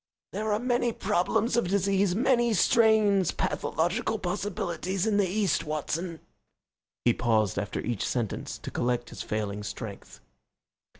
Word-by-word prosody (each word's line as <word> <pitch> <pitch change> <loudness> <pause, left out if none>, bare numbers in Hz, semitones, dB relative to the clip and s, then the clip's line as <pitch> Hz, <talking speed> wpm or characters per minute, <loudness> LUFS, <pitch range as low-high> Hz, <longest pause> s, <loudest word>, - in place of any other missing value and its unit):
"There 215 +1 -2
are 210 - +3
many 245 0 +1
problems 215 +4 +1
of 235 -6 +2
disease, 195 0 +2
many 240 0 +3
strange 210 -3 +4
pathological 215 +7 0
possibilities, 185 -1 -2
in 215 -2 +2
the 200 -2 +3
East, 195 -2 +1
Watson." 160 +2 -3 0.8
He 120 - +5
paused 110 -5 +1
after 100 0 -3
each 120 -2 -2
sentence 120 -5 -3
to - - -8
collect 120 0 -1
his - - -7
failing 105 -1 -3
strength. 105 -1 -7
185 Hz, 130 wpm, -28 LUFS, -, 0.8 s, He